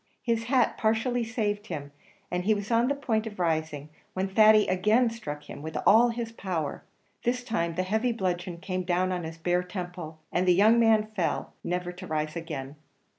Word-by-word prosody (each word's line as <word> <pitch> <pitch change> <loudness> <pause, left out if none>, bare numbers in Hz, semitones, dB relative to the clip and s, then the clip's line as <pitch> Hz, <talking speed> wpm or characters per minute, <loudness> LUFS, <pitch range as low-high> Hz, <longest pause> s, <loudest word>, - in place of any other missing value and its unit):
His 230 -1 0
hat 250 0 +2
partially 230 +3 +1
saved 215 -2 -2
him, 145 -4 -6 0.4
and 180 0 -1
he 215 +3 +3
was 205 +2 -5
on 230 +1 +3
the 280 - +1
point 225 -6 -1
of 210 - -8
rising, 155 -4 -1 0.3
when 190 +1 0
Thady 215 +1 +6
again 215 +6 +3
struck 170 -11 -6
him - - -8
with 160 +1 -5
all 235 +3 +6
his 230 -1 -4
power; 180 -9 -4 0.4
this 245 +1 -1
time 170 -9 -1
the 185 - 0
heavy 220 +6 0
bludgeon 180 -5 -2
came 185 +1 -3
down 180 +1 0
on 180 -1 -2
his 160 0 -7
bare 175 +2 +1
temple, 180 -3 -6
and 180 +1 +1
the 180 - +6
young 220 +5 +5
man 220 -2 +4
fell, 175 -5 -1
never 180 0 -2
to 180 +1 -10
rise 155 0 -2
again. 150 -4 -6
185 Hz, 190 wpm, -28 LUFS, 175-225 Hz, 0.4 s, Thady